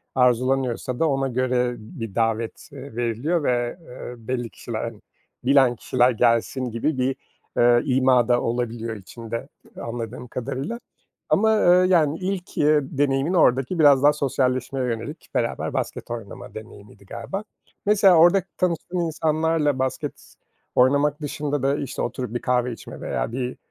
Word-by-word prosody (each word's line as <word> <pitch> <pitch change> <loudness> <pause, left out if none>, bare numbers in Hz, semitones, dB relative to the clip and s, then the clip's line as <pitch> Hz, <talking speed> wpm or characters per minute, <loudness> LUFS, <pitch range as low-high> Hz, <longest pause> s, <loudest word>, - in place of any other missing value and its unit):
arzulanıyorsa 125 0 +1
da 165 - +3
ona 135 -1 0
göre 125 -1 0
bir 115 - -8
davet, 115 +1 -1
eee, 140 -3 -10
veriliyor 120 +8 0
ve, 120 0 0
eee, 125 -4 -9
belli 120 +1 -4
kişiler, 115 0 -5 0.5
bilen 130 -1 +4
kişiler 125 +2 +2
gelsin 120 +2 +1
gibi 130 +6 -1
bir, 130 +1 0 0.4
ııı, 120 0 +5
ima 130 -2 +3
da 120 -1 +3
olabiliyor 115 -1 -2
içinde 115 +5 -7 0.3
anladığım 120 +1 -6
kadarıyla. 135 - -4 0.5
Ama, 220 +2 +4
ııı, 180 -2 +5
yani, 160 -4 +3
ilk, 185 -1 -4
ııı, 150 0 +4 0.2
deneyimin 140 +3 +1
oradaki 135 -1 +3
biraz 145 -3 +6
daha 145 +1 +6
sosyalleşmeye 130 -2 0
yönelik, 115 -2 -5
beraber - - -1
basket - - -4
oynama 115 -4 -7
deneyimiydi 100 -2 -12
galiba. 195 - -5 0.4
Mesela 200 -3 +5
orada 175 +3 +6
tanıştığın 180 0 -1
insanlarla 160 -3 +1
basket 130 0 -4 0.4
oynamak 145 +4 +3
dışında 145 -1 -2
da 140 +1 +2
işte, 135 -2 -4
oturup 125 -3 -3
bir 120 - -1
kahve 125 -1 +1
içme - - -10
veya - - -2
bir, 125 0 -3
130 Hz, 140 wpm, -23 LUFS, 120-150 Hz, 0.5 s, biraz